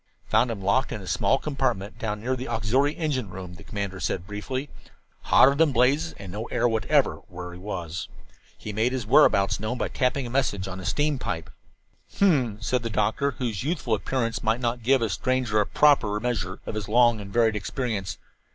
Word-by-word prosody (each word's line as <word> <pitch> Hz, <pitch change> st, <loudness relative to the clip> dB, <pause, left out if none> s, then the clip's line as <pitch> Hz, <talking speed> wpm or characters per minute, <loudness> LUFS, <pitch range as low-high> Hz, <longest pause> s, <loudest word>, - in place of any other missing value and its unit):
"Found 125 Hz, -, +3 dB
him 105 Hz, -4 st, -5 dB
locked 115 Hz, +8 st, +2 dB
in -, -, -4 dB
a 95 Hz, -, -10 dB
small 135 Hz, -, +2 dB
compartment 130 Hz, -9 st, -2 dB
down 105 Hz, -2 st, -3 dB
near 130 Hz, +3 st, -1 dB
the 130 Hz, 0 st, -6 dB
auxiliary 130 Hz, +7 st, +1 dB
engine 140 Hz, -, -1 dB
room," 90 Hz, -1 st, -8 dB
the 90 Hz, -, -13 dB
commander 100 Hz, -2 st, -4 dB
said 90 Hz, -1 st, -2 dB
briefly. 120 Hz, +7 st, -4 dB, 0.6 s
"Hotter 135 Hz, -, +6 dB
than 155 Hz, +1 st, +3 dB
blazes, 135 Hz, +6 st, +2 dB
and 95 Hz, -3 st, -9 dB
no 105 Hz, +4 st, -4 dB
air 120 Hz, 0 st, +1 dB
whatever 110 Hz, -2 st, +2 dB
where 90 Hz, 0 st, -8 dB
he 90 Hz, -, -10 dB
was. 90 Hz, -4 st, -5 dB, 0.5 s
He 105 Hz, -, -7 dB
made 115 Hz, +5 st, +1 dB
his 130 Hz, -5 st, -2 dB
whereabouts 100 Hz, -5 st, +4 dB
known 110 Hz, +4 st, -3 dB
by -, -, -2 dB
tapping 130 Hz, 0 st, 0 dB
a 120 Hz, -, -6 dB
message 110 Hz, -8 st, 0 dB
on 95 Hz, 0 st, -6 dB
a 95 Hz, -, -8 dB
steam 145 Hz, +7 st, 0 dB
pipe." 80 Hz, -7 st, -4 dB, 0.6 s
"H'm," 130 Hz, -, +2 dB
said 125 Hz, +3 st, 0 dB
the 115 Hz, -, -3 dB
doctor, 110 Hz, +6 st, 0 dB
whose 115 Hz, -7 st, -2 dB
youthful 150 Hz, -6 st, -1 dB
appearance 115 Hz, +3 st, -1 dB
might 110 Hz, +2 st, +1 dB
not 120 Hz, 0 st, -1 dB
give 130 Hz, +1 st, +3 dB
a 115 Hz, -, 0 dB
stranger 125 Hz, +1 st, 0 dB
a 105 Hz, -, -1 dB
proper 125 Hz, -9 st, +3 dB
measure 100 Hz, -6 st, -2 dB
of -, -, -4 dB
his 105 Hz, -2 st, -4 dB
long 120 Hz, -1 st, +4 dB
and 100 Hz, 0 st, -9 dB
varied 115 Hz, 0 st, +3 dB
experience. 105 Hz, -3 st, -3 dB
115 Hz, 195 wpm, -25 LUFS, 100-130 Hz, 0.6 s, Hotter